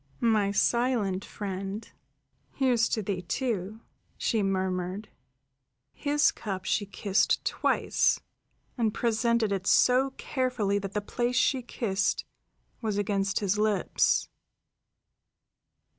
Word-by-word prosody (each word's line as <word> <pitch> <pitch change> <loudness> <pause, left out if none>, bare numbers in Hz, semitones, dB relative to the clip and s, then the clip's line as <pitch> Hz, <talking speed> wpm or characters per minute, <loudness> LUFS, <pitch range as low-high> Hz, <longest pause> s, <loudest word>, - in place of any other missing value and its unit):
"My 215 -3 +3
silent 215 -3 +1
friend, 195 +1 -5 0.7
here's 245 -4 +2
to 220 - -1
thee, 190 -2 -2
too," 215 +1 -3 0.4
she 225 -3 0
murmured. 190 +1 -2 0.8
His 290 - +2
cup 190 -3 -5
she 205 - 0
kissed 200 0 +1
twice, - - +1 0.6
and 220 -2 +1
presented 235 -2 +1
it 195 -1 0 0.5
carefully 250 -7 -1
so - - 0
that 195 -1 -6
the 210 - -1
place 240 +4 -2
she 260 +1 +2
kissed 205 -4 -1 0.6
was 215 -3 -1
against 200 0 0
his 200 0 0
lips. 210 -4 +2
205 Hz, 105 wpm, -28 LUFS, 195-235 Hz, 0.8 s, My